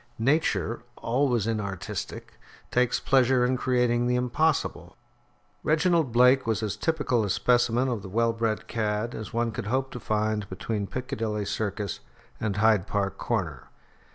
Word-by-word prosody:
Nature, 130 -2 +1 0.2
always 120 -3 +1
inartistic, 105 -5 -4 0.3
takes 125 -1 +2
pleasure 130 -1 +3
in 130 +1 +1
creating 125 -1 +1
the 125 - +2
impossible. 140 +5 0 0.6
Reginald 160 -2 +2
Blake 125 +2 +5
was 110 0 0
as 105 -2 -2
typical 145 -8 0
a 100 - -2
specimen 120 +4 +2
of 120 -5 -2
the 95 - -8
well 115 +3 +1
bred 115 -1 -1
cad 110 +1 -1
as 110 - -6
one 115 0 0
could 105 - -5
hope 130 +3 0
to 125 - -6
find 110 -2 -1
between 100 +2 -3
Piccadilly 110 -4 -3
Circus 100 -1 -3 0.4
and 105 -3 -1
Hyde 105 -2 +3
Park 100 -2 -2
Corner. 85 - -2
115 Hz, 145 wpm, -27 LUFS, 105-125 Hz, 0.6 s, Blake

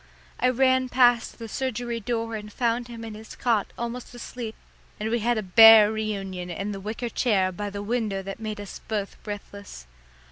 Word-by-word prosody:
I 250 - +3
ran 260 0 +3
past 245 -2 +3
the 230 - -7
surgery 240 -1 -3
door 230 0 -2
and 210 -1 -7
found 240 +1 0
him 230 -1 -8
in 220 - -7
his 220 +1 -10
cot 230 -5 +1
almost 235 +1 -5
asleep, 240 -2 -7 0.4
and 215 +1 -2
we 235 - +1
had 235 +1 +1
a 215 - -1
bear 220 +2 +8
reunion 195 -4 -4
in 195 +4 -4
the 195 - -5
wicker 215 +5 -4
chair 200 -6 +1
by 205 +3 -4
the 200 0 -6
window 210 -3 -1
that 195 +2 -7
made 215 -1 -5
us 205 -1 -8
both 205 -2 -4
breathless. 200 - -8
220 Hz, 185 wpm, -25 LUFS, 205-240 Hz, 0.4 s, bear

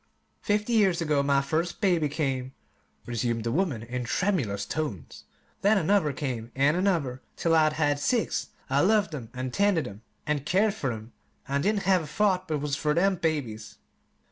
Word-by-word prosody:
"Fifty 210 +3 0
years 195 -6 +3
ago 150 -4 +1
my 140 0 +2
first 160 +5 -1
baby 175 -7 +2
came," 135 -3 -2 0.5
resumed 120 -1 -1
the 115 - -1
woman 145 - 0
in 125 +2 -4
tremulous 120 - 0
tones; 120 - -5 0.4
"then 205 +2 +4
another 190 -3 +2
came, 125 -4 -4
and 140 +3 +3
another, 165 -9 0
till 165 - +1
I'd 155 -1 +4
had 145 -2 +1
six. 235 - 0 0.2
I 135 +1 +1
loved 205 -3 +3
'em, 125 -7 -6
an' 130 0 -3
tended 200 -1 +2
'em, 100 +1 -10 0.2
an' 150 -1 0
cared 195 +9 +2
fer 140 - -2
'em, 110 +1 -8 0.3
an' 140 +1 0
didn't 205 +3 +1
have 185 -1 +3
a 155 - -7
thought 185 +2 +1
but 155 -3 -1
was 145 -1 -1
fer 150 +1 0
them 190 +2 +3
babies. 115 -11 -3
150 Hz, 175 wpm, -27 LUFS, 130-185 Hz, 0.5 s, then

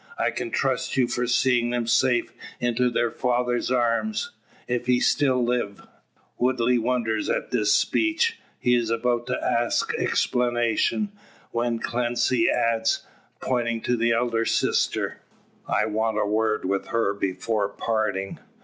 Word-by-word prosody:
I - - +1
can - - -4
trust - - -1
you 125 -2 +3
for 125 0 -1
seeing 120 -1 +2
them 120 -1 -1
safe 120 +1 +2 0.3
into 120 0 +1
their 120 -1 0
father's 125 -1 0
arms 130 - 0 0.4
if 125 0 -2
he 125 -1 +3
still 130 -3 +2
live." 120 -4 -2 0.5
Woodley 125 -1 +2
wonders 115 -2 -1
at - - -2
this 105 -4 +2
speech. 330 - +1 0.2
He 125 - +1
is 120 -2 +1
about 120 +1 0
to 125 - -1
ask 120 0 0
explanation, 120 - 0 0.4
when 115 0 0
Clancy 120 0 +1
adds, 115 -1 +1 0.4
pointing 115 -3 -1
to 125 - 0
the 115 0 +1
elder 115 -1 +1
sister - - 0 0.5
"I - - +1
want 110 0 -1
a 105 - +1
word 110 0 0
with 95 +1 -1
her 115 -4 0
before 100 +2 -1
parting. 100 -3 -2
120 Hz, 140 wpm, -25 LUFS, 115-125 Hz, 0.5 s, you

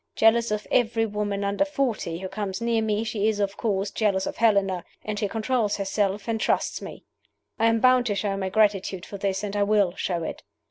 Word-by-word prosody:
Jealous 230 +1 +4
of 210 0 -2
every 225 -2 +2
woman 205 -1 -2
under 200 +7 +1
forty 260 - -2
who 190 +2 -5
comes 195 -1 -4
near 230 -1 +1
me, 215 0 0
she 215 -2 -1
is, 215 -2 0
of 200 -1 0
course, 200 -3 -1
jealous 195 -3 +1
of - - -5
Helena 200 -5 +2 0.2
and 210 -1 -3
she 205 - 0
controls 220 0 0
herself, 200 +1 -1
and 225 -1 -1
trusts - - 0
me! - - -9 0.6
"I 225 - +4
am 225 0 +3
bound 255 0 +4
to 205 - 0
show 200 0 -1
my 190 -1 -2
gratitude 200 -3 +1
for 200 - -8
this 195 0 -1
and 205 0 -3
I 205 - +1
will 200 -3 +3
show 175 -4 -2
it. - - -5
210 Hz, 215 wpm, -25 LUFS, 195-225 Hz, 0.6 s, Jealous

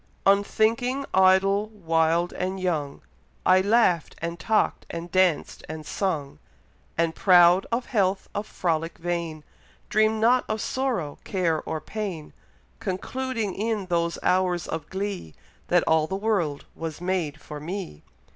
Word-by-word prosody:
Unthinking, 225 +7 +2
idle, 190 +2 +4
wild, 165 -3 +1
and 185 +1 -3
young, 155 -6 -2 0.4
I 185 0 +6
laugh'd, 200 -5 +2
and 170 0 -4
talk'd, 220 -1 +1
and 170 +1 -6
danc'd, 185 -4 +1
and 155 -1 -6
sung; 155 -8 -2 0.6
And 165 0 +1
proud 180 0 +5
of 235 +2 0
health, 195 -5 0
of 205 +1 -3
frolic 165 -4 -2
vain, 170 -2 -3 0.5
Dream'd 215 0 +3
not 245 +3 +4
of 215 - -1
sorrow, 230 - -2
care, 170 -5 0
or 160 - -2
pain, 190 -6 -5 0.5
Concluding 225 +2 -3
in 215 -1 -2
those 170 -1 0
hours 180 -1 +1
of 160 -2 -5
glee, 190 - -4 0.3
That - - +3
all 160 -1 +3
the 190 - -3
world 195 -8 -1
was 160 -2 -6
made 175 -5 -2
for 150 0 -8
me. 170 - -6
185 Hz, 135 wpm, -25 LUFS, 165-205 Hz, 0.6 s, I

